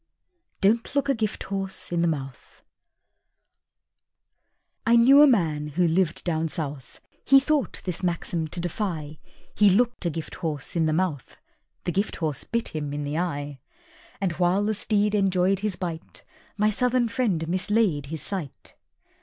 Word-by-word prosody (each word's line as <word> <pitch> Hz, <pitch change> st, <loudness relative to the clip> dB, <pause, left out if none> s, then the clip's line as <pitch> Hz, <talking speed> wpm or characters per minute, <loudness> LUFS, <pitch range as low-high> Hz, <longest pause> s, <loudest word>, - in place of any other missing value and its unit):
_ -, -, -47 dB
"Don't 230 Hz, +7 st, +2 dB
Look 280 Hz, 0 st, +1 dB
a -, -, +4 dB
Gifthorse 195 Hz, -5 st, -3 dB
in 170 Hz, -1 st, +1 dB
the 170 Hz, -, +3 dB
Mouth" 135 Hz, -5 st, -5 dB, 2.2 s
I 230 Hz, +1 st, +4 dB
knew 265 Hz, +5 st, +7 dB
a 295 Hz, -, +9 dB
man, 160 Hz, -, +1 dB
who 170 Hz, +4 st, +1 dB
lived 170 Hz, 0 st, 0 dB
down 165 Hz, -2 st, 0 dB
South; 145 Hz, -5 st, -6 dB, 0.2 s
He 275 Hz, 0 st, +7 dB
thought 290 Hz, 0 st, -1 dB
this 180 Hz, -2 st, -2 dB
maxim 170 Hz, -2 st, -1 dB
to 175 Hz, -, -5 dB
defy; 170 Hz, -4 st, -4 dB, 0.3 s
He 205 Hz, -1 st, +5 dB
looked 235 Hz, -1 st, +2 dB
a -, -, +2 dB
Gifthorse 160 Hz, -2 st, -5 dB
in 165 Hz, -2 st, +2 dB
the -, -, +1 dB
Mouth; 155 Hz, -5 st, -2 dB, 0.5 s
The -, -, -1 dB
Gifthorse 165 Hz, -7 st, -2 dB
bit 235 Hz, 0 st, -1 dB
him 145 Hz, -2 st, -4 dB
in 145 Hz, 0 st, -3 dB
the 145 Hz, +3 st, -2 dB
Eye! 145 Hz, -5 st, -3 dB, 0.6 s
And, 195 Hz, -3 st, 0 dB
while 180 Hz, +3 st, +3 dB
the 215 Hz, +1 st, +1 dB
steed 210 Hz, 0 st, 0 dB
enjoyed 190 Hz, -1 st, +2 dB
his 205 Hz, -2 st, -2 dB
bite, 170 Hz, -3 st, -6 dB, 0.3 s
My 210 Hz, +1 st, +3 dB
Southern 250 Hz, +2 st, +1 dB
friend 215 Hz, -9 st, -1 dB
mislaid 185 Hz, -4 st, +1 dB
his 155 Hz, -1 st, -5 dB
sight. 180 Hz, -9 st, -6 dB
180 Hz, 155 wpm, -25 LUFS, 155-210 Hz, 2.2 s, a